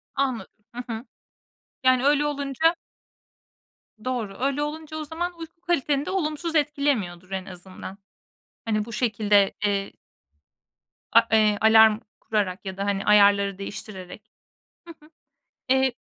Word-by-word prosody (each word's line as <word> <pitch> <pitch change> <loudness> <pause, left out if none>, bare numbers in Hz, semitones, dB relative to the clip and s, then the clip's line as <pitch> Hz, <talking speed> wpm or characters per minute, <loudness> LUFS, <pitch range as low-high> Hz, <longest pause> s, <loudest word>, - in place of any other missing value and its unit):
Anladım. 265 -4 -1 0.2
Hı 245 - -4
hı. 225 +3 -6 0.8
Yani 255 0 +4
öyle 295 +1 +3
olunca 285 +3 +1 1.3
Doğru. 235 -6 -3
Öyle 275 +2 0
olunca 310 +1 -6
o 310 - -4
zaman 340 +3 -5
uyku 330 +1 -10
kaliteni 295 -5 0
de - - -4
olumsuz 330 -2 -2
etkilemiyordur 275 - 0
en 190 -1 -3
azından. 185 +1 -10 0.7
Hani 215 -2 0
bu 230 - -10
şekilde, 210 -4 +2
eee 200 -1 0 1.2
A - - +5
eee, 215 -2 +4
alarm 220 -1 +6 0.2
kurarak 205 -3 -2
ya 190 0 -6
da, 200 - -2
hani, 200 0 -1
ayarları 200 -1 +4
değiştirerek... 200 0 -8 0.6
Hı 335 - -9
hı. - - -20 0.6
Eee 265 -1 +3
230 Hz, 125 wpm, -25 LUFS, 200-290 Hz, 1.3 s, alarm